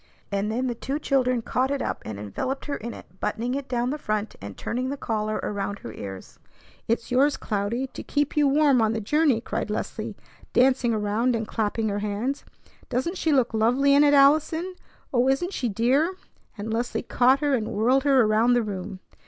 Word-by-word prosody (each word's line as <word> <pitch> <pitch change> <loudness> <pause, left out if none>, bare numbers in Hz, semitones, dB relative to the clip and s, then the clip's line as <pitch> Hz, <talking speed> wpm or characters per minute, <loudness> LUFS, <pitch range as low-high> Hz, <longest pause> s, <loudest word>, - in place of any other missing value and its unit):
And 200 +1 -1
then 250 +4 -1
the 245 - -1
two 270 +4 -3
children 255 -5 +1
caught 255 +3 0
it 280 0 -1
up, - - -3
and 110 -2 -6
enveloped 255 - -4
her 290 - -2
in 235 +2 -6
it, 185 -4 -13
buttoning 240 +3 -2
it 275 -1 -4
down 245 0 0
the 300 - -4
front 215 -4 -2
and 100 0 -8
turning 255 +2 -2
the 280 - -3
collar 215 -3 -2
around 200 0 -3
her 115 - -9
ears. 95 -2 -9 0.5
"It's 230 +1 -1
yours, 275 +3 +3
Cloudy, 215 +5 -2
to 265 - -9
keep 290 -1 -1
you 295 -1 +4
warm 280 -3 +4
on 220 0 +2
the 225 - -1
journey!" 285 +2 +2
cried 230 - -3
Leslie, 210 - -4 0.4
dancing 255 -1 +3
around 220 +3 +1
and 220 -1 -3
clapping 220 0 -1
her 205 0 -2
hands. 210 +7 -2 0.5
"Doesn't 335 +9 -2
she 320 - +1
look 260 -5 +2
lovely 250 +6 +3
in 285 +1 +6
it, 290 0 +5
Allison? 315 +6 +4 0.4
Oh, 245 0 +3
isn't 350 +8 0
she 245 - -1
dear?" 265 - +2 0.4
and 215 +2 -4
Leslie 240 +2 -2
caught 255 +3 +3
her 290 -2 +1
and 225 -4 0
whirled 250 +6 +2
her 270 -3 +5
around 220 +3 +3
the 240 -1 +3
room. 195 -2 -6
245 Hz, 200 wpm, -25 LUFS, 215-275 Hz, 0.5 s, in